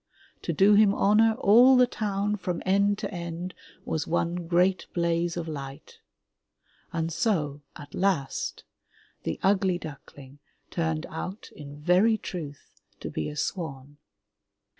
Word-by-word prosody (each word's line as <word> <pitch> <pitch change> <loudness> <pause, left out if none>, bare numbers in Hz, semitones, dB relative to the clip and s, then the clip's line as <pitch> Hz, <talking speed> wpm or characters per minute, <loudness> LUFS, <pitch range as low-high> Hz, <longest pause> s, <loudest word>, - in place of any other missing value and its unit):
To - - -2
do 200 +1 +5
him 205 -1 +5
honor 220 +2 +4
all 250 +3 +6
the 250 - +7
town, 210 -3 -1
from 180 -3 -4
end 200 +2 +3
to 210 - -5
end, 170 +1 -5 0.3
was 155 -2 -2
one 170 +1 -1
great 180 +2 +2
blaze 170 0 0
of 165 -1 -4
light. 140 -3 -8 0.9
And 165 0 -2
so, 155 - 0
at 145 -2 -11
last, 180 -8 -1 0.6
the - - -4
ugly 190 -2 +3
duckling 145 -3 -11 0.3
turned 160 -2 -1
out, 185 +6 -7
in 145 -1 -10
very 185 +8 +4
truth, 155 -8 -8 0.2
to - - -6
be 80 - -3
a 150 - -8
swan. 145 -4 -4
175 Hz, 135 wpm, -27 LUFS, 155-200 Hz, 0.9 s, the